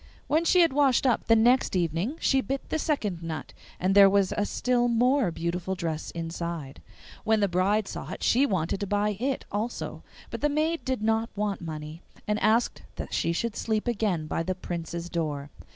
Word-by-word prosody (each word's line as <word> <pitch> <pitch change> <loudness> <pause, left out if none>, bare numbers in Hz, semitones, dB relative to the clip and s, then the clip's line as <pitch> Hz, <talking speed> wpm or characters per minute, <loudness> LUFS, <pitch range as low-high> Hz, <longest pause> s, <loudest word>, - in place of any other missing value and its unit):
When 315 +3 +1
she 360 +1 +5
had 330 -5 +4
washed 275 -2 +3
up 245 -4 +1
the 225 - +6
next 240 0 +3
evening 175 - 0
she 270 -1 +3
bit 270 +1 -4
the 315 - -1
second 210 - -1
nut, 165 -2 -6 0.3
and 185 +2 +1
there 200 0 +8
was 195 -1 +2
a 205 - 0
still 245 -1 +1
more 245 0 +3
beautiful 170 +3 -3
dress 160 -3 -3
inside. 165 -3 -5 0.4
When 220 0 +3
the 200 - +3
bride 195 +3 +1
saw - - -6
it - - -6
she 270 +4 +4
wanted 185 - -1
to 200 - -3
buy 205 +1 +1
it 265 +2 -1
also. 215 +4 -3 0.3
But - - -5
the 295 - +2
maid 310 +3 0
did 260 -5 -1
not 225 +1 +1
want 205 -1 -2
money, 155 0 -7 0.3
and 210 0 +1
asked 225 +3 +2
that - - -6
she 165 - +1
should 220 +6 -2
sleep 220 +1 -1
again 205 -9 0
by 155 - -2
the 185 +3 -2
Prince's 170 -1 -5
door. 150 -4 -3
205 Hz, 195 wpm, -27 LUFS, 170-245 Hz, 0.4 s, there